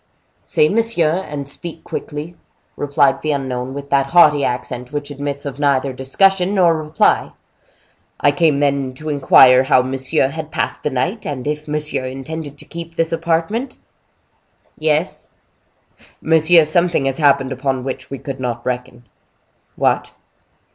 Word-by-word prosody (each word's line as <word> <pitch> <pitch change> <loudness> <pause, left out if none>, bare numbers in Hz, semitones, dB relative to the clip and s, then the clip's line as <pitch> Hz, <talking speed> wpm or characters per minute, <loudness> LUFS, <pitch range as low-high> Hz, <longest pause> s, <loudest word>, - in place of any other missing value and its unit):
"Say 150 - +2
monsieur, 190 -5 +1
and 145 -2 -5
speak 165 +3 -6
quickly," 150 +3 -6 0.4
replied 140 -1 +1
the 155 -1 0
unknown, 130 -1 -4
with 140 0 -8
that 135 -1 +2
haughty 150 -3 +5
accent 125 0 -3
which 145 0 -5
admits 140 0 -5
of 140 0 -6
neither 140 -2 +1
discussion 185 +9 +2
nor 175 -4 +4
reply. 155 0 +1 0.9
"I 145 - +4
came, 145 -1 +2
then, 140 -2 0
to 155 +3 -7
inquire 130 -2 +6
how 130 -1 +4
monsieur 130 +2 0
had 155 +2 -6
passed - - -2
the - - -1
night, 175 - -2
and 135 -4 -5
if 150 +1 -3
monsieur 150 -3 -2
intended 145 +3 -7
to - - -9
keep 165 0 -9
this 165 0 0
apartment?" 170 +10 -1 1.0
"Yes." 155 +2 -1 0.9
"Monsieur, 160 +1 +4
something 170 -2 +1
has 135 +1 -2
happened 140 -2 +3
upon 130 0 -2
which 130 0 -6
we 135 - -5
could 135 0 -7
not 120 -2 -4
reckon." 125 -1 -4 0.7
"What?" - - 0
145 Hz, 145 wpm, -18 LUFS, 135-160 Hz, 1.0 s, inquire